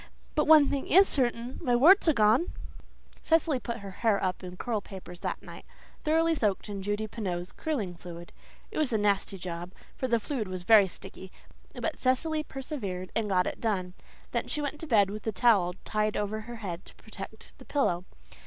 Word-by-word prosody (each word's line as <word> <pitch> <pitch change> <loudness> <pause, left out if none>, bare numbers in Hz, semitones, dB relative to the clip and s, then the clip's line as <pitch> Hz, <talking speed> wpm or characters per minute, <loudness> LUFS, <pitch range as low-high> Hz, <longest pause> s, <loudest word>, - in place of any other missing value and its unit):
But 300 - +1
one 305 -2 +8
thing 275 -1 -2
is 385 +4 +7
certain 245 -2 -1
my 245 -1 +2
warts 340 +10 +6
are 320 - +6
gone." 225 +8 +3 0.7
Cecily 320 -4 +2
put 235 -1 -5
her 200 -1 -7
hair 220 -4 +2
up 185 0 -1
in 180 0 -8
curl 225 -1 -2
papers 180 -3 -10
that - - -4
night, - - -10 0.4
thoroughly 325 +1 +3
soaked 210 -8 0
in 200 -1 -4
Judy 205 +2 -1
Pineau's 185 -5 -4
curling 235 - -3
fluid. 170 -1 -10 0.4
It - - -3
was 300 -5 +1
a 220 - +2
nasty 200 -1 +1
job, 175 0 -6 0.2
for 260 - -2
the 235 -2 +2
fluid 225 -2 -3
was 185 -1 -5
very 210 0 +7
sticky, 190 0 -10 0.4
but - - -3
Cecily 305 +5 +1
persevered 250 - -5
and 220 -2 0
got 180 -2 +3
it - - -4
done. 185 -5 -1 0.4
Then - - -1
she 300 - -2
went 295 0 -3
to 325 - -7
bed 205 -7 +4
with 215 +1 -7
a - - +2
towel 195 -4 +3
tied 215 0 0
over 210 +1 -2
her 240 - -5
head 190 -5 -6
to - - -10
protect 220 0 -10
the - - -13
pillow. 185 -11 0
215 Hz, 195 wpm, -29 LUFS, 190-265 Hz, 0.7 s, one